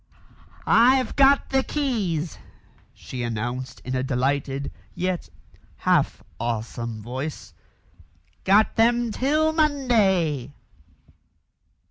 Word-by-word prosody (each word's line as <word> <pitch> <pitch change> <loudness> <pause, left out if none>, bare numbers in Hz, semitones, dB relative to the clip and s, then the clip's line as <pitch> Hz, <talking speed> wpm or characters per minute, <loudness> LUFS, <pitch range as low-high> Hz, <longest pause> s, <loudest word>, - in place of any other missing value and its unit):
"I've 255 +3 +4
got 275 0 +4
the 265 0 +3
keys," 210 - -2 0.5
she 125 - -8
announced 120 +3 -4
in 130 - -4
a 130 - 0
delighted, 135 +2 -1 0.2
yet 180 0 -2 0.5
half - - +1 0.2
awesome 115 -1 -4
voice. 130 +6 -6 0.9
"Got 205 +3 +3
them 235 +1 +3
till 305 +6 +1
Monday!" 200 - +1
170 Hz, 85 wpm, -24 LUFS, -, 0.9 s, I've